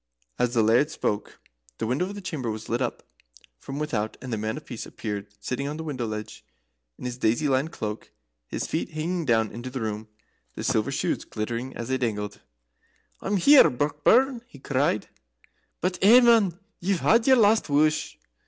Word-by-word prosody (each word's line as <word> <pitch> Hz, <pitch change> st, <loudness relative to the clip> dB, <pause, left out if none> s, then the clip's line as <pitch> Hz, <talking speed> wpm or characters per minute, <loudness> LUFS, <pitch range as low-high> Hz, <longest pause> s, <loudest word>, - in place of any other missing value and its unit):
As 125 Hz, 0 st, +1 dB
the 115 Hz, -, +4 dB
Laird 120 Hz, +7 st, +4 dB
spoke 105 Hz, -9 st, -3 dB, 0.4 s
the -, -, -2 dB
window 130 Hz, +10 st, 0 dB
of 200 Hz, +2 st, -7 dB
the 205 Hz, -, -7 dB
chamber 150 Hz, -10 st, -4 dB
was 110 Hz, 0 st, -5 dB
lit 120 Hz, +2 st, -1 dB
up 125 Hz, -, -2 dB, 0.6 s
from 135 Hz, -, -7 dB
without, 130 Hz, -8 st, -2 dB
and 125 Hz, -2 st, -6 dB
the -, -, 0 dB
Man 110 Hz, +4 st, -2 dB
of 150 Hz, -, -9 dB
Peace 120 Hz, -4 st, -7 dB
appeared 105 Hz, -2 st, -5 dB
sitting 140 Hz, +2 st, -3 dB
on 150 Hz, +1 st, -4 dB
the 160 Hz, -, -5 dB
window 130 Hz, -7 st, -3 dB
ledge 110 Hz, 0 st, -6 dB, 0.5 s
in -, -, -9 dB
his 125 Hz, 0 st, -4 dB
daisy 120 Hz, +7 st, +2 dB
lined 135 Hz, +4 st, +1 dB
cloak, 105 Hz, -7 st, -5 dB, 0.4 s
his -, -, -3 dB
feet 160 Hz, -, -2 dB
hanging 165 Hz, +2 st, -2 dB
down 110 Hz, -4 st, +2 dB
into 120 Hz, +4 st, -6 dB
the 130 Hz, +1 st, -5 dB
room, 110 Hz, -1 st, -4 dB, 0.5 s
the -, -, -5 dB
silver -, -, +1 dB
shoes -, -, -1 dB
glittering 120 Hz, +4 st, -4 dB
as 120 Hz, +1 st, -5 dB
they 130 Hz, 0 st, 0 dB
dangled. 105 Hz, -4 st, -3 dB, 0.8 s
"I'm 205 Hz, -, 0 dB
here, 280 Hz, +10 st, +7 dB
Brockburn!" 150 Hz, -, +2 dB
he 245 Hz, -, -14 dB
cried. 135 Hz, -5 st, 0 dB, 0.7 s
"But 180 Hz, +1 st, -1 dB
eh, 225 Hz, +6 st, +8 dB
man! 225 Hz, -8 st, +4 dB, 0.2 s
ye've 190 Hz, 0 st, 0 dB
had 230 Hz, +2 st, +4 dB
your 260 Hz, -1 st, +7 dB
last 220 Hz, -4 st, +4 dB
wush." 155 Hz, +1 st, +2 dB
130 Hz, 185 wpm, -26 LUFS, 115-170 Hz, 0.8 s, eh